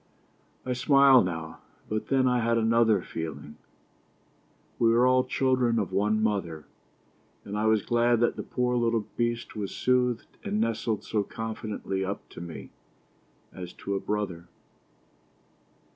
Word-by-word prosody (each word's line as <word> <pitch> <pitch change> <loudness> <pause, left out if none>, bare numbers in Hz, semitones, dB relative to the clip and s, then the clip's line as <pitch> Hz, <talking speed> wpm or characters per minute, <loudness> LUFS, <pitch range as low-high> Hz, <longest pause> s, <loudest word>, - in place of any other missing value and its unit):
I 130 - -1
smile 135 0 +6
now... 80 -3 -4 0.3
but 110 0 -3
then 130 -1 +2
I 125 -1 +2
had 115 0 +1
another 115 -3 +3
feeling. 75 -2 -7 1.2
We 115 -1 +4
are 120 +1 +5
all 130 0 +4
children 130 -2 +1
of 105 -5 -1
one 105 +2 +1
mother, 85 -8 -2 0.8
and 100 - -5
I 105 +1 +1
was 110 -2 +3
glad 120 0 +2
that 120 - +2
the - - -4
poor 125 -1 -1
little 115 -3 +1
beast 120 0 -2
was 100 -2 -4
soothed 125 -2 0
and 105 - -1
nestled 110 -1 -1
so 110 - -1
confidingly 105 -2 -4
up 100 +1 -5
to - - -10
me, 85 -2 -8 0.8
as 90 -1 -8
to 100 - -5
a 100 - 0
brother. 95 -5 -3
110 Hz, 145 wpm, -27 LUFS, 100-120 Hz, 1.2 s, smile